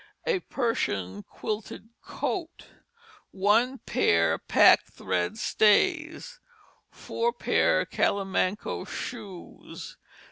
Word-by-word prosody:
A 475 Hz, -6 st, +1 dB
Persian 100 Hz, -, -2 dB
Quilted 215 Hz, -, -6 dB
Coat. 340 Hz, -3 st, -5 dB, 0.6 s
1 220 Hz, +7 st, +2 dB
p. 85 Hz, -1 st, +2 dB, 0.2 s
Pack -, -, +6 dB
Thread 90 Hz, -1 st, -2 dB
Stays. 325 Hz, -, +1 dB, 0.5 s
4 470 Hz, +1 st, -2 dB
p. -, -, -7 dB
Callimanco 195 Hz, 0 st, +1 dB
Shoes. 205 Hz, -8 st, -8 dB
215 Hz, 75 wpm, -27 LUFS, -, 0.6 s, Pack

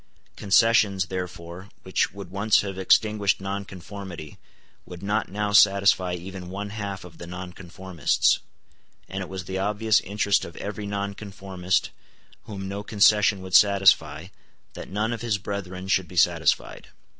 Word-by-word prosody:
Concessions, 100 Hz, -2 st, +3 dB
therefore, 90 Hz, 0 st, -7 dB
which 95 Hz, -, 0 dB
would 100 Hz, -3 st, -10 dB
once 100 Hz, +3 st, +3 dB
have 100 Hz, -2 st, -5 dB
extinguished 100 Hz, +2 st, +2 dB
nonconformity 95 Hz, -4 st, -7 dB, 0.4 s
would 90 Hz, +1 st, -11 dB
not 100 Hz, +1 st, -1 dB
now 105 Hz, +1 st, -2 dB
satisfy 100 Hz, -3 st, +4 dB
even 90 Hz, 0 st, -8 dB
one 100 Hz, +2 st, -5 dB
half 100 Hz, -2 st, -5 dB
of 85 Hz, -2 st, -14 dB
the 85 Hz, -, -8 dB
nonconformists; 90 Hz, -2 st, -1 dB, 0.7 s
and 95 Hz, +1 st, -5 dB
it 95 Hz, -, -6 dB
was 95 Hz, -1 st, -6 dB
the 95 Hz, +1 st, -4 dB
obvious 105 Hz, +2 st, +2 dB
interest 100 Hz, 0 st, 0 dB
of 85 Hz, -, -9 dB
every 105 Hz, 0 st, -5 dB
nonconformist 100 Hz, -2 st, -3 dB, 0.5 s
whom 95 Hz, -2 st, -6 dB
no 100 Hz, +1 st, -4 dB
concession 105 Hz, -1 st, +3 dB
would 95 Hz, -1 st, -9 dB
satisfy 95 Hz, -5 st, +4 dB, 0.4 s
that -, -, -9 dB
none 105 Hz, +4 st, -1 dB
of 115 Hz, -, -6 dB
his 115 Hz, -4 st, 0 dB
brethren 95 Hz, -2 st, -6 dB
should 95 Hz, -2 st, +1 dB
be 90 Hz, -, -12 dB
satisfied. 85 Hz, -, +1 dB
95 Hz, 140 wpm, -25 LUFS, 90-100 Hz, 0.7 s, satisfy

